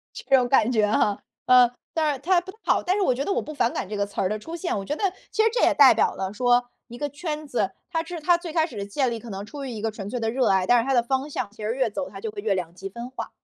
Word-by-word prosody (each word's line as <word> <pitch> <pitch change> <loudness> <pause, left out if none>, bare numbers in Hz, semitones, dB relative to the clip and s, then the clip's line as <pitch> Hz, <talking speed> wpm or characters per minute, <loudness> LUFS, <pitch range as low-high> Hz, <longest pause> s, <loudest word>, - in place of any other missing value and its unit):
这 270 - +3
种 250 -2 +2
感 250 -3 +4
觉 215 -4 +3
哈。 205 -2 +1 0.2
嗯， 250 -1 +7 0.2
但 310 -2 +2
是 270 - -5
它 355 +3 +3
不 370 - -9
太 435 - -23
好， - - +2
但 370 +2 +1
是 410 - +1
我 255 - +3
觉 275 +3 -2
得 395 - -1
我 - - 0
不 305 - -8
反 235 -4 +1
感 190 - -4
这 210 - -4
个 200 0 0
词 200 - -5
儿 185 - +1
的 215 +1 -2
出 325 +10 -7
现。 345 - -2
我 195 - -5
觉 295 - -2
得 410 - -3 0.3
其 435 - +2
实 445 - +5
这 485 - 0
也 - - +4
代 - - +8
表 445 -3 +2
了 190 +1 -4
说， 245 +1 +2 0.2
一 240 +1 -10
个 290 - -2
圈 305 +1 -5
子， 240 -7 -1 0.2
它 325 -2 0
是 340 -1 -6
它 345 +3 +4
最 340 -2 -7
开 320 -1 +2
始 245 - -11
的 200 - -3
建 255 +5 0
立 230 - -3
可 230 -1 -10
能 195 +1 -5
处 280 +5 -7
于 265 - -5
一 220 -3 -6
个 225 0 -1
纯 205 -2 -7
粹 245 - -3
的 225 0 0
热 255 +2 +1
爱， 190 -1 +2
但 245 0 +5
是 230 - -3
它 270 - +1
的 240 - +4
方 265 +4 -1
向， 210 - -3
其 215 +1 -12
实 220 +3 -1
越 260 -3 +1
走 275 +6 -4
他 - - -9
就 445 - -4
会 415 -1 -7
越 195 - +1
两 175 -2 -4
极 195 +2 -7
分 235 +5 -8
化。 260 - -6
250 Hz, 360 characters per minute, -25 LUFS, 215-310 Hz, 0.3 s, 代